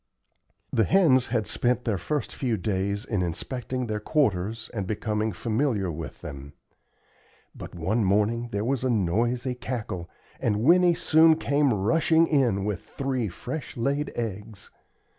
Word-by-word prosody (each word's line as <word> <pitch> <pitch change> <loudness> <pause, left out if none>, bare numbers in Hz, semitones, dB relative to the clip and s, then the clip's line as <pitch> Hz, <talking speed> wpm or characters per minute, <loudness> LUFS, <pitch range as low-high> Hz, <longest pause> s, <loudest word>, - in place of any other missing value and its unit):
The 110 - +3
hens 150 -10 +4
had 110 - 0
spent 125 +2 0
their 105 -6 0
first 150 - -3
few 120 -5 -1
days 100 +2 -2
in 105 -7 -1
inspecting 125 +8 -3
their 105 -2 -2
quarters 110 - 0
and 100 -5 -3
becoming 110 +1 -1
familiar 110 -1 -1
with 75 -4 -7
them; 70 0 -8 1.0
but - - -10
one 105 +7 0
morning 105 +5 +1
there 100 0 -2
was 130 0 0
a 130 - +1
noisy 120 +5 0
cackle, 115 -8 -5 0.3
and 105 -1 0
Winnie 175 +3 +5
soon 160 0 +5
came 140 -2 +2
rushing 160 - +3
in 120 -11 +1
with 105 -5 -2
three 130 -5 -2
fresh 145 - -6
laid 140 +5 -1
eggs. 105 -2 -6
115 Hz, 140 wpm, -26 LUFS, 100-130 Hz, 1.0 s, Winnie